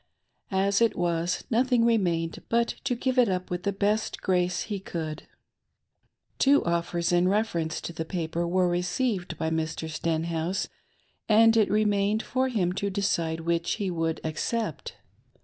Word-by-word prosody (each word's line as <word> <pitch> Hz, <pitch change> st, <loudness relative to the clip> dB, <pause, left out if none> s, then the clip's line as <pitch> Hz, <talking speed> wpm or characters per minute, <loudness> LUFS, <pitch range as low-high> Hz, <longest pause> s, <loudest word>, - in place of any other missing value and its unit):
As 200 Hz, +2 st, +1 dB
it 230 Hz, -, +3 dB
was, 170 Hz, 0 st, -1 dB
nothing 245 Hz, 0 st, +3 dB
remained 175 Hz, -8 st, +1 dB
but 235 Hz, 0 st, +2 dB, 0.2 s
to 255 Hz, -2 st, +1 dB
give 255 Hz, +1 st, 0 dB
it 240 Hz, -4 st, +5 dB
up 185 Hz, -1 st, -2 dB
with 175 Hz, 0 st, -2 dB
th^ 200 Hz, 0 st, -2 dB
best 210 Hz, +2 st, 0 dB
grace 180 Hz, -1 st, 0 dB
he 205 Hz, -3 st, -4 dB
could. 160 Hz, -4 st, -5 dB, 1.1 s
Two 280 Hz, +1 st, +4 dB
offers 170 Hz, 0 st, 0 dB
in 175 Hz, +1 st, +3 dB
reference 185 Hz, -6 st, 0 dB
to 170 Hz, -, -6 dB
the 160 Hz, -, -3 dB
paper 170 Hz, 0 st, -2 dB
were 180 Hz, +1 st, +2 dB
received 180 Hz, +3 st, -1 dB
by 160 Hz, -, -1 dB
Mr. 160 Hz, 0 st, -2 dB
Stenhouse, 165 Hz, +3 st, -1 dB, 0.6 s
and 225 Hz, +1 st, +6 dB
it 220 Hz, -2 st, +4 dB
remained 210 Hz, 0 st, +2 dB
for 260 Hz, 0 st, 0 dB
him 190 Hz, -8 st, 0 dB
to 200 Hz, +1 st, -2 dB
decide 170 Hz, -5 st, -1 dB
which 170 Hz, 0 st, 0 dB
he 200 Hz, -4 st, -2 dB
would 165 Hz, -1 st, -1 dB
accept. 220 Hz, +9 st, -3 dB
185 Hz, 150 wpm, -27 LUFS, 170-215 Hz, 1.1 s, and